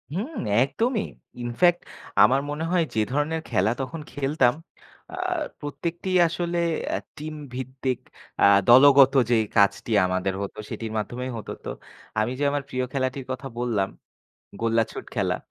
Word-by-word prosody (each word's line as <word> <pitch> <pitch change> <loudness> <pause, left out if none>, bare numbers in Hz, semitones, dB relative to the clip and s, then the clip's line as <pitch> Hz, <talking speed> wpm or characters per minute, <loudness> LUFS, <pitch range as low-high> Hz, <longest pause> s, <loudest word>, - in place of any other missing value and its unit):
হুম 245 - -3 0.3
একদমই। 225 - 0 0.4
ইনফ্যাক্ট 175 +9 +3 0.4
আমার 135 +2 +4
মনে 150 +2 -3
হয় 175 -3 +3
যে, 110 - 0
ধরনের 150 +3 0
খেলা 95 +4 +2
তখন 155 +5 -5
খেলতাম, 135 -3 +2 0.6
আ - - -4 0.4
প্রত্যেকটি 165 +6 -4 0.2
আসলে 175 +1 -2 0.3
অ্যা - - 0 0.2
টিম 155 +1 -6 0.2
ভিত্তিক 130 0 -3 0.4
আ - - +7 0.2
দলগত 135 +2 +8 0.2
যে - - +5 0.2
কাজটি 100 +3 +3
আমাদের 95 +1 -1
হতো 100 +2 -5
সেটির 110 -1 -5
মাধ্যমেই 120 +5 -3
হতো. 110 - -7
তো, - - -3 0.5
আমি 110 +3 +1
যে 145 - 0
আমার 145 -1 -1
প্রিয় 130 0 -1
খেলাটির 130 0 -2
কথা 130 +1 -5
বললাম, 110 -6 0 0.7
গোল্লাছুট 115 -1 0
খেলা, - - +1
135 Hz, 140 wpm, -25 LUFS, 120-155 Hz, 0.7 s, দলগত